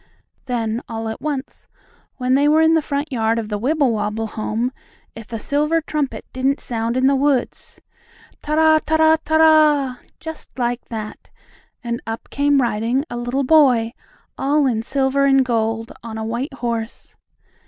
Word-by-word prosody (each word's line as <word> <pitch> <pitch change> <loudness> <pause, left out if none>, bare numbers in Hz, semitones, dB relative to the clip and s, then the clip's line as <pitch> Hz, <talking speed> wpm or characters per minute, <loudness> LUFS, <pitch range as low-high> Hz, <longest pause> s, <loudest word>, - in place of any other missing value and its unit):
Then, 230 -2 -2
all 225 -1 -4
at 220 - -6
once, 285 -2 -5 0.5
when 255 -1 0
they 285 +2 +4
were 310 +2 +4
in 320 0 +4
the 320 - +3
front 285 +1 -3
yard 225 -2 +1
of 220 -2 -3
the 210 -1 -2
Wibblewobble 225 -5 0
home, 220 +3 -2 0.4
if 225 0 -11
a 225 - -3
silver 300 +8 0
trumpet 300 -3 -3
didn't 265 +2 0
sound 230 0 -2
in 260 - +2
the 275 +1 +4
woods: 275 -2 -1 0.6
"Ta 300 0 -2
ra 315 0 +5
ta 315 - 0
ra 315 0 +5
ta 315 - -1
ra!" 305 -5 +4 0.2
just 320 -4 -9
like 245 -1 -1
that, 215 -2 -7 0.5
and 235 0 -3
up 225 0 -6
came 285 -1 +2
riding 235 +4 0
a - - -4
little 245 +3 -1
boy, 255 -6 +4 0.5
all 290 +1 +2
in 235 -4 +1
silver 275 +3 +1
and 270 -1 +4
gold, 225 -1 -1
on 225 -1 -7
a 220 - -4
white 245 +5 -3
horse. 230 -3 -5
255 Hz, 165 wpm, -20 LUFS, 230-290 Hz, 0.6 s, ra